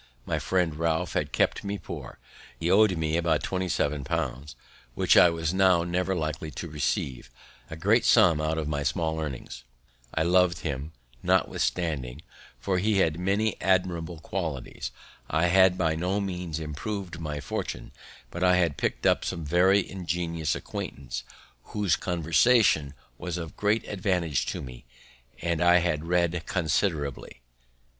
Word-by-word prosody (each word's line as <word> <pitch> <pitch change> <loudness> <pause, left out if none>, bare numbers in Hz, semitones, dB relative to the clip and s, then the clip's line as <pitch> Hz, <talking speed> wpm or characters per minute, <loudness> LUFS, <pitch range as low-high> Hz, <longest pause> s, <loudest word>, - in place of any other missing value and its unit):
My - - -1
friend 90 -4 0
Ralph 80 -1 0
had - - -1
kept - - +1
me 100 0 -3
poor; - - -8 0.4
he 85 +2 0
owed 100 -2 +5
me 80 0 0
about 85 -3 +1
twenty 95 -1 -2
seven 75 -3 0
pounds, 65 +3 -3 0.4
which - - +3
I 90 - +8
was 80 0 -2
now 95 -3 +4
never 90 +2 -1
likely 80 -2 -3
to 85 - -6
receive; 70 -4 -2 0.4
a 80 - -6
great 80 - +3
sum 80 -4 +5
out 80 +1 -1
of 80 -2 -2
my 75 -1 -1
small 80 +2 -1
earnings! 65 -5 -6 0.5
I 80 - 0
lov'd 90 -1 +3
him, 70 0 -4 0.3
notwithstanding, 75 -6 0 0.4
for 95 +7 0
he 105 +2 +1
had 80 -3 +2
many 100 +3 0
amiable 90 -2 0
qualities. 80 -6 -4 0.4
I 80 +2 +2
had 95 0 +5
by 80 -3 +1
no 90 +5 -1
means 90 -5 -3
improv'd 85 +4 -5
my 75 -2 -4
fortune; 70 - -5 0.4
but 85 - -3
I 90 -1 +5
had 85 -5 +1
picked - - -2
up - - +3
some 80 -2 -4
very 95 +5 +3
ingenious 85 -3 -2
acquaintance, 65 -3 -6 0.5
whose 105 -4 +2
conversation 85 - +3 0.2
was 90 -1 -4
of 85 -2 -6
great 105 +2 0
advantage 90 - 0
to - - -3
me; 60 -2 -10 0.6
and 85 -1 0
I 90 0 +6
had 85 -3 0
read 85 -1 +1
considerably. 80 -7 -1
85 Hz, 150 wpm, -27 LUFS, 75-90 Hz, 0.6 s, I